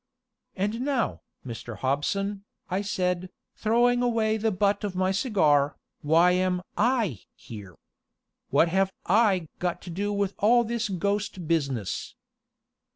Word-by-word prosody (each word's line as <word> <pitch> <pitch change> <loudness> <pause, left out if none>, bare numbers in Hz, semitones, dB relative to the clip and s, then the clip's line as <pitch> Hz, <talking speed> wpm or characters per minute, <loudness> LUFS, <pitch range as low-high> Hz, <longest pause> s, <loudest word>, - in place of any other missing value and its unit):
"And 210 +5 -1
now, 265 -3 -1 0.2
Mr. 120 -1 -7
Hobson," 195 +9 -1 0.3
I 190 +2 0
said, 180 -2 -1 0.3
throwing 240 +2 +2
away 225 -3 +1
the 220 +1 +1
butt 200 +1 +1
of 200 -3 -3
my 185 +1 +1
cigar, 155 - +2 0.2
"why 165 +4 +4
am 180 0 +1
I 220 - +1 0.2
here? 100 -6 -11 0.7
What 170 - +4
have 190 +2 +1
I 195 -4 +3
got 175 -1 -1
to 175 - -7
do 200 +4 -2
with 200 -1 -1
all 240 +4 +5
this 230 -1 -2
ghost 195 -2 -2
business?" 140 - -2
195 Hz, 130 wpm, -26 LUFS, 170-215 Hz, 0.7 s, all